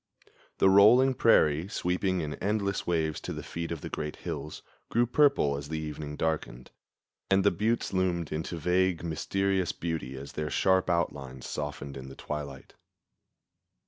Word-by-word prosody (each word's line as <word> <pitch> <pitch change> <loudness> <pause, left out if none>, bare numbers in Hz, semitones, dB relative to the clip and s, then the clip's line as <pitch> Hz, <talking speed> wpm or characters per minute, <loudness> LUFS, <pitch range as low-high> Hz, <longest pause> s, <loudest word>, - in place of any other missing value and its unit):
The - - +4
rolling 110 +7 +7
prairie, 80 - +4
sweeping 90 -1 -1
in 75 -1 -3
endless 100 -1 -1
waves 80 -3 0
to - - -5
the - - -6
feet 85 0 -5
of 80 -3 -4
the - - -6
great 75 0 -4
hills, 75 - -6 0.3
grew 120 +1 +3
purple 130 - +3
as 70 +1 -6
the 80 - -2
evening 75 -1 -5
darkened, 75 -6 -3 0.6
and 95 0 +4
the - - +5
buttes 110 +5 -1
loomed 90 -3 0
into 80 +2 -3
vague, 90 +1 +1
mysterious 95 +3 0
beauty 80 -6 -4
as 70 +1 -8
their 75 0 -3
sharp 95 +3 +2
outlines 70 -7 -2
softened 70 -2 -5
in 65 0 -8
the 65 - -10
twilight. 70 -2 -6
85 Hz, 155 wpm, -29 LUFS, 75-95 Hz, 0.6 s, rolling